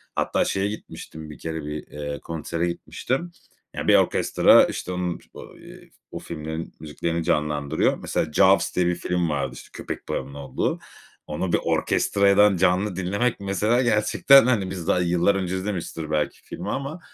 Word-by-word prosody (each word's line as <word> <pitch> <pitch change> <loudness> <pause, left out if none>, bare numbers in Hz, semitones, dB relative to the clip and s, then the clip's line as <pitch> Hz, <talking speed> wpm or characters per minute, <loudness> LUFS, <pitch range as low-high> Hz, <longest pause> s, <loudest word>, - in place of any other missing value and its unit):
Hatta - - +1
şeye 95 +1 0
gitmiştim 80 -6 -8
1 75 - -10
kere, 80 -2 -5
bir, 75 0 -6
eee, 75 -1 -6
konsere 85 +1 -3
gitmiştim. 135 - -3 0.4
Ya, - - -4
bir - - +6
orkestra, - - +5
işte, 90 - -5
onun 90 -1 -2
o, - - -10
ııı, - - -14 0.3
o - - -6
filmlerin 80 0 -6
müziklerini 80 +2 -3
canlandırıyor. 75 -3 0
Mesela 80 - -2
"Jaws" 95 +4 +4
diye 90 - +2
bir 90 - +1
film 90 -1 -1
vardı. 70 -3 -1
İşte, - - -12
köpek - - -7
balığının 70 - -3
olduğu. 70 -2 -3 0.5
Onu 85 +4 -3
bir - - +4
orkestrayadan 100 0 +3
canlı 95 +2 +2
dinlemek 100 +6 -1
mesela 105 +5 +1
gerçekten, 120 +3 +5
hani, 105 -7 +1
biz 90 -3 -6
daha 90 - +3
yıllar 90 +3 +2
önce 95 -1 -2
izlemişizdir 90 -5 -4
belki 75 -1 -1
filmi - - -7
ama, 140 +6 -4
90 Hz, 160 wpm, -24 LUFS, 80-100 Hz, 0.5 s, bir